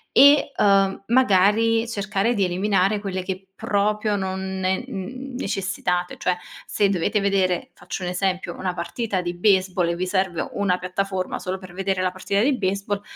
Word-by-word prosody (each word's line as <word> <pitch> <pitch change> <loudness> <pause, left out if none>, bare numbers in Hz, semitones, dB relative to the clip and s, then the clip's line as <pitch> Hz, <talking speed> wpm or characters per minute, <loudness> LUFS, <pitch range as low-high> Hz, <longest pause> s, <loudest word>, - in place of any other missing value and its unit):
e, 285 +1 +7
uhm, 195 -1 +3
magari 225 0 +3
cercare 210 +1 0
di 200 - +2
eliminare 195 +2 +1
quelle 190 -2 -4
che 190 +1 -5
proprio 210 +1 0
non 190 0 -3
ne 190 +4 0
necessitate. 195 -6 -3
Cioè, 180 -1 0 0.3
se 205 - +2
dovete 200 +3 +1
vedere, 190 -3 +1
faccio 180 +1 -7
un 180 - -2
esempio, 185 -1 -1
una 185 -1 -3
partita 185 +3 -2
di 175 -1 -3
baseball 185 -2 +2
e 170 - 0
vi 180 +2 -2
serve 185 -3 0
una 200 -3 +1
piattaforma, 185 +1 -3
solo 185 +1 -3
per 185 -2 -12
vedere 190 0 -1
la 185 0 +1
partita 195 +2 -1
di 270 +4 +3
baseball, 200 0 -1
195 Hz, 160 wpm, -23 LUFS, 185-205 Hz, 0.3 s, e